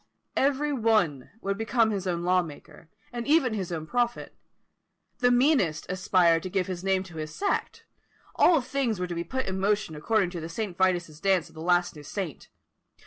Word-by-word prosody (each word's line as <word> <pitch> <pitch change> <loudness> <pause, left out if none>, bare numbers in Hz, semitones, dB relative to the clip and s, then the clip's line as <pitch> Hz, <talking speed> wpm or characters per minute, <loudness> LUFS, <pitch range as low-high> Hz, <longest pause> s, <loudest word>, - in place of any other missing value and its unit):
Every 285 +2 +1
one 215 - +1
would 200 +1 -2
become 225 0 +2
his 195 -2 -3
own 170 -1 -1
law 180 +1 +3
maker, 160 0 -11 0.2
and 240 0 -4
even 285 -6 +3
his 190 -5 -3
own 160 -2 -4
prophet; 240 +5 -1 0.8
the 245 0 +4
meanest 245 - +2
aspired 180 -3 +3
to 185 - -5
give 185 0 0
his 185 -2 -5
name 190 -1 +1
to 175 -4 -12
his 155 0 -5
sect. 400 - -2 0.5
All 330 -5 +5
things 250 -5 -1
were 180 - -1
to 175 - -5
be 170 0 -3
put 260 +7 -3
in 190 0 -3
motion 205 -4 0
according 190 +4 +1
to 175 -2 -5
the 160 - -6
St. 195 +1 -4
Vitus's 175 -4 0
dance 190 -2 +1
of - - -20
the 160 - -9
last 175 0 +2
new 150 - -10
saint. 165 +1 -6
190 Hz, 195 wpm, -27 LUFS, 170-230 Hz, 0.8 s, All